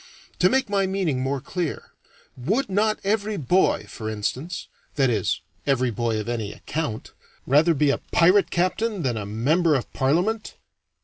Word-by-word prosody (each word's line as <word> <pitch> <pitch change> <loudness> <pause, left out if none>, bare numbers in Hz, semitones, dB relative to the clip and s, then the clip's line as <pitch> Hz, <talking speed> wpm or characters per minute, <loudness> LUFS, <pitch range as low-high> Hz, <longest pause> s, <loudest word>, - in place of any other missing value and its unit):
To 180 - +5
make 265 +3 +2
my 200 -1 +1
meaning 185 -8 0
more 135 +1 -1
clear, 170 +4 -4 0.4
would 200 - -1
not 215 +2 +2
every 210 +1 0
boy, 180 +5 +2
for 110 -2 -6
instance 125 - -4 0.3
that 135 -3 +3
is, 105 -5 0 0.3
every 130 -3 +2
boy 115 0 -1
of 105 - -5
any 115 -4 -2
account 135 -9 -4 0.3
rather 155 +5 +4
be 145 0 +3
a - - -1
pirate 185 +4 +5
captain 185 +2 0
than 125 -3 0
a 105 -2 -4
Member 150 - +2
of 130 - -3
Parliament? 180 +12 0
155 Hz, 160 wpm, -24 LUFS, 125-190 Hz, 0.4 s, To